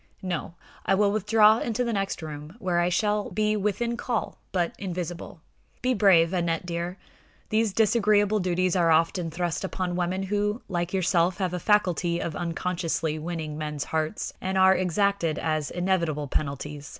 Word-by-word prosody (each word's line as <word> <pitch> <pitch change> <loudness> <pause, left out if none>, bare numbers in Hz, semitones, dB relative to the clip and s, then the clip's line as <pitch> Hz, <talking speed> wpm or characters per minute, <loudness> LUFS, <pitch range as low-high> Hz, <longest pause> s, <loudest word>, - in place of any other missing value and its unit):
No; 175 -2 -3 0.3
I - - +2
will 200 +1 +3
withdraw 215 +1 +4
into 235 +1 -1
the 235 -1 -1
next 195 -4 -2
room, 150 +2 -8
where 180 -6 0
I 175 +1 +2
shall 210 +2 0
be 215 0 +1
within 210 +4 -1
call, 240 -2 -3
but 175 -2 0
invisible. 175 -3 -5 0.4
Be 255 0 +2
brave, 190 -6 +4
Aneth 170 -1 0
dear. 175 +1 -4 0.5
These 220 -1 +2
disagreeable 210 -1 +3
duties 185 -1 +1
are 170 -2 +3
often 165 +2 +2
thrust 175 +2 -2
upon 185 -2 -2
women 180 +2 -1
who, 210 +3 -1
like 175 -2 -2
yourself, 180 -1 +2
have 185 -3 -1
a 180 - -2
faculty 180 -4 +2
of 165 -3 -3
unconsciously 170 -2 -2
winning 155 -2 -4
men's 150 -2 -3
hearts, 160 +4 -2
and 190 +1 -1
are 190 0 +6
exacted 185 -2 +1
as 155 -2 -1
inevitable 170 -5 0
penalties. 145 +1 -3
180 Hz, 160 wpm, -26 LUFS, 165-205 Hz, 0.5 s, are